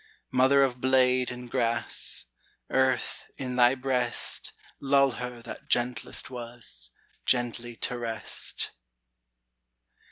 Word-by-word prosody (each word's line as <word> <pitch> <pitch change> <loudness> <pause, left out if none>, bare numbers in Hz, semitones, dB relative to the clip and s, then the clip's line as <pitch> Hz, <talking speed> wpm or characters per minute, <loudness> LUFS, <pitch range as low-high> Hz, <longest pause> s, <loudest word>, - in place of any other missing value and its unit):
Mother 130 +2 +5
of 125 -2 0
blade 130 -1 +4
and 125 0 -7
grass, 120 -1 0 0.5
Earth, 130 -1 +1
in 125 -2 -3
thy 125 +1 +6
breast 130 -1 -1 0.3
Lull 140 0 +4
her 125 -1 -6
that 120 - -9
gentlest 120 0 0
was 115 - -8 0.4
Gently 120 -1 0
to 120 +1 -3
rest! 115 -2 -2
125 Hz, 100 wpm, -28 LUFS, 120-130 Hz, 0.5 s, thy